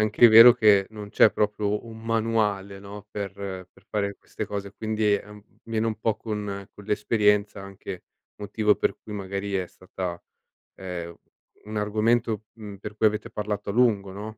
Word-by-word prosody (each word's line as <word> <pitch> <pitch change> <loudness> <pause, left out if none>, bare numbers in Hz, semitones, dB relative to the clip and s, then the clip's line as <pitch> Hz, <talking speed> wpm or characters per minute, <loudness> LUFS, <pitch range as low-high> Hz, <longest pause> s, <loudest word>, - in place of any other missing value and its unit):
anche 110 +3 +6
vero 115 +2 +10
che 105 -4 +5
non 105 -2 -9
c'è 110 - +6
proprio 105 0 -1
un 115 -1 -10
manuale, 110 -3 0
no, 100 +1 -10
per 100 -2 -4
per 95 -2 -8
fare 100 -1 -1
queste - - -7
cose, 100 -1 -5
quindi 110 0 0
è 100 - 0
un 105 -1 -12 0.2
viene 115 0 -1
un 110 -1 -2
po' 110 -1 0
con 105 -3 -5
con 105 - -14
l'esperienza, 105 -1 +1
anche 95 -1 -8 0.3
motivo 105 +1 +1
per - - 0
cui, 105 - -9
magari, 100 0 -4
è 95 -1 0
stata 90 -1 -6 0.5
ehm, 85 -2 -6 0.5
un 105 +1 -7
argomento, 110 +1 +1
mhmm, 105 -3 -9
per 105 +2 -9
cui 110 - +3
avete 105 0 -1
parlato 105 -1 -3
a - - -2
lungo, 105 -5 +2
no? 105 +2 -8
105 Hz, 170 wpm, -25 LUFS, 100-110 Hz, 0.5 s, vero